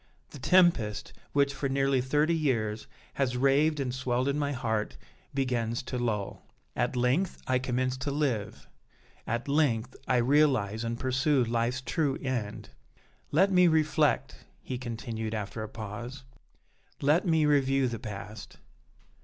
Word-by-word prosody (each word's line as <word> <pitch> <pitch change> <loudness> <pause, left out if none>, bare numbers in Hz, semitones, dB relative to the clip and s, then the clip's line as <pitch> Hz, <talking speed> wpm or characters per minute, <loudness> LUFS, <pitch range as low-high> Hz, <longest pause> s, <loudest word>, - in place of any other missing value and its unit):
The 145 - -10
tempest, 140 - +3 0.2
which, 140 -1 +2
for 135 0 -2
nearly 135 -1 +2
thirty 150 +5 +2
years, 115 -9 -1 0.3
has 125 -3 0
raved 145 +4 +3
and 130 -3 -2
swelled 130 0 -1
in 140 +1 0
my 145 -1 0
heart, 110 -5 -2 0.3
begins 120 -4 -1
to 125 -1 -4
lull! 105 -5 -2 0.3
At - - 0
length 125 +10 +1
I 130 -1 +2
commence 130 0 -1
to 130 +2 -3
live 125 -8 -2 0.6
at 115 +3 -2
length 130 -5 +1
I 130 - +3
realize 120 -5 +2
and 115 0 -3
pursue 135 +1 +2
life's 120 +2 -1
true 145 0 0
end. 120 -6 -4 0.6
Let 190 +6 +3
me 180 -1 +6
reflect," 155 -2 +1 0.2
he 125 -2 -4
continued, 115 -2 -4
after 105 +1 -4
a 110 - -5
pause, 120 +5 -7 0.8
"let 150 +7 +2
me 160 -2 +3
review 135 -2 +3
the 115 -2 -4
past. 105 -1 -8
130 Hz, 140 wpm, -29 LUFS, 115-145 Hz, 0.8 s, me